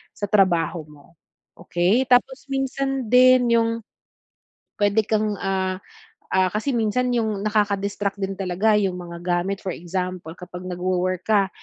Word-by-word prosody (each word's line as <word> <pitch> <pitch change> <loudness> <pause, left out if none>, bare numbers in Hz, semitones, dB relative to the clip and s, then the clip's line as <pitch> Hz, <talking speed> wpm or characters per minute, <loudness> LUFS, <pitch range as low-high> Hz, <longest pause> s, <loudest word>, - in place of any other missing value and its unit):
sa 205 - -3
trabaho 175 -4 +2
mo, 145 -1 -17 0.5
okey? 180 +8 +1
Tapos 265 +2 +2
minsan 270 -1 -2
din 250 -1 +6
yung 230 0 +3 1.1
puwede 205 +1 +3
kang, 215 -1 +1
ah, 190 -1 -1 0.6
ah, 185 -1 +3
kasi 225 +6 -1
minsan 240 +3 +1
yung 215 -4 -1
nakaka-distract 205 -1 0
din 195 0 -2
talaga 195 +3 +1
yung 190 -3 0
mga 170 -1 -8
gamit 180 +2 -1
for 190 - -3
example 180 -1 -4
kapag 180 0 -9
nagwo-work 185 0 -1
ka, 200 -3 +3
200 Hz, 135 wpm, -23 LUFS, 180-225 Hz, 1.1 s, din